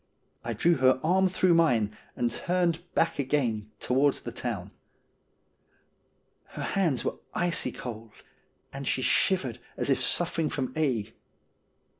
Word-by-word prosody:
I 115 - -3
drew 170 +10 +3
her 130 0 +4
arm 185 +3 +3
through 185 -1 +3
mine, 120 -11 +3 0.2
and 120 -1 0
turned 175 +3 0 0.2
back 165 -2 +1
again 120 -7 0
towards 135 +2 +2
the - - -6
town. - - -4 1.8
Her - - -4
hands 170 -10 0
were - - -2 0.2
icy 175 -2 +1
cold, 115 -2 -7 0.6
and 135 0 -6
she 130 - 0
shivered 130 - +2 0.2
as - - 0
if 130 - +2
suffering 165 +4 +1
from 130 -2 -3
ague. 130 -10 0
140 Hz, 130 wpm, -28 LUFS, 120-170 Hz, 1.8 s, her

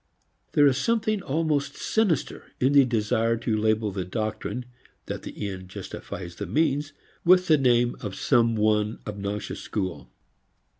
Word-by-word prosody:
There 145 - +6
is 135 -1 +4
something 215 +2 +1
almost 150 -2 -1
sinister 220 -7 -1
in 130 +3 +3
the 140 -2 +7
desire 115 0 +1
to 115 -1 -1
label 110 0 +1
the 95 -1 -3
doctrine 110 +5 -3 0.4
that - - -5
the 105 - -5
end 95 -2 -7
justifies 85 -1 -7
the 100 - -4
means 145 - +1 0.3
with 180 +1 +6
the 155 -4 +4
name 120 -2 +3
of 100 -4 -5
some 115 0 +3
one 105 0 +1
obnoxious 100 0 -4
school. 95 -4 -4
115 Hz, 145 wpm, -26 LUFS, 105-145 Hz, 0.4 s, the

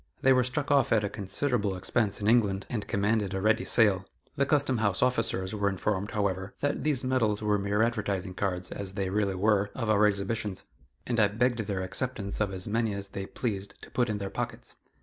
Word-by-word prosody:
They 135 - +6
were 130 -1 +4
struck 140 +4 -2
off 140 -1 +3
at 110 -2 +3
a 105 - -1
considerable 105 +1 -1
expense 100 +3 0
in 105 - -2
England, 105 -4 +3
and 110 -4 -3
commanded 100 -1 0
a - - -1
ready 110 +4 +2
sale. 100 -5 +5 0.3
The 140 -2 +1
Custom 140 -5 +2
house 100 -2 +1
officers 100 -6 0
were 100 -2 +1
informed, 100 +1 -1
however, 100 -2 -2
that 145 - -1
these 145 -4 +1
medals 115 -5 +1
were 105 -1 +2
mere 100 +2 +1
advertising 100 -5 -1
cards, 90 -2 -2
as 95 -1 -5
they 95 -2 -2
really 100 -1 0
were, 100 +1 +2
of 115 -4 0
our 105 0 +5
exhibitions, 100 0 -2 0.4
and 120 -2 0
I 105 - +6
begged 120 +4 0
their 100 -3 -2
acceptance 100 +1 -3
of 105 -2 +1
as 95 -1 -5
many 110 -1 0
as 100 0 -6
they 95 0 -5
pleased 100 -5 -4
to - - -11
put 125 -2 +1
in 105 - -1
their 100 -1 -5
pockets. 120 0 -5
105 Hz, 210 wpm, -28 LUFS, 100-120 Hz, 0.4 s, They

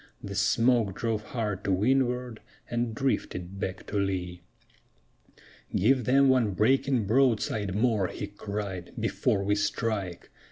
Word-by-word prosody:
The 100 - -5
smoke 110 +1 +2
drove 115 -2 -1
hard 105 -5 -3
to 100 - 0
windward 125 +3 +1 0.3
and 120 -1 -1
drifted 100 -7 -2
back 95 -1 -4
to 105 - -2
lee. 90 -3 -2 1.3
"Give 125 +4 +3
them 135 +3 +5
one 120 -7 +3
breaking 130 +1 +2
broadside 110 -4 +1
more," 110 -4 +2
he 105 - -5
cried, 100 -3 -6
"before 100 - 0
we 100 +1 +1
strike!" 105 -3 -2
105 Hz, 125 wpm, -28 LUFS, 100-120 Hz, 1.3 s, them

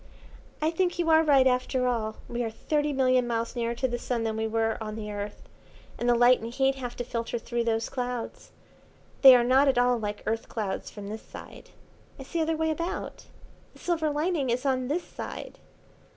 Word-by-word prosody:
"I 315 - +2
think 350 +1 0
you 335 -2 +1
are 320 0 +7
right 280 -4 +5
after 255 0 +1
all. 220 -3 -1
We 240 0 -2
are 225 - -2
thirty 295 +6 -1
million 255 -2 +2
miles 230 0 -2
nearer 235 0 -1
to 260 - 0
the 240 -1 -3
Sun 235 -2 -2
than 220 -1 -1
we 220 0 -1
were 225 0 0
on 215 -1 -5
the 210 -1 -5
Earth, 205 0 -6 0.6
and 240 - 0
the 240 - +5
light 245 +1 +5
and 230 +1 -6
heat 270 +2 +2
have 250 -3 -6
to 245 - -3
filter 235 -1 -3
through 235 0 -2
those 225 -1 0
clouds. 250 -2 -5 0.7
They 265 -2 +11
are 245 - +4
not 260 +3 +4
at 265 - +3
all 245 -1 +3
like 210 -1 -4
Earth 225 +1 -2
clouds 210 -4 -3
from 205 -2 -9
this 220 +1 -6
side. - - -12 0.5
It's 270 -2 -11
the 335 - +1
other 320 0 0
way 320 0 +1
about. 335 +3 -4 0.5
The - - -18
silver 330 -3 0
lining 300 -2 0
is 250 +3 -1
on 255 -2 +1
this 325 +6 -1
side. - - -8
245 Hz, 210 wpm, -27 LUFS, 230-275 Hz, 0.7 s, They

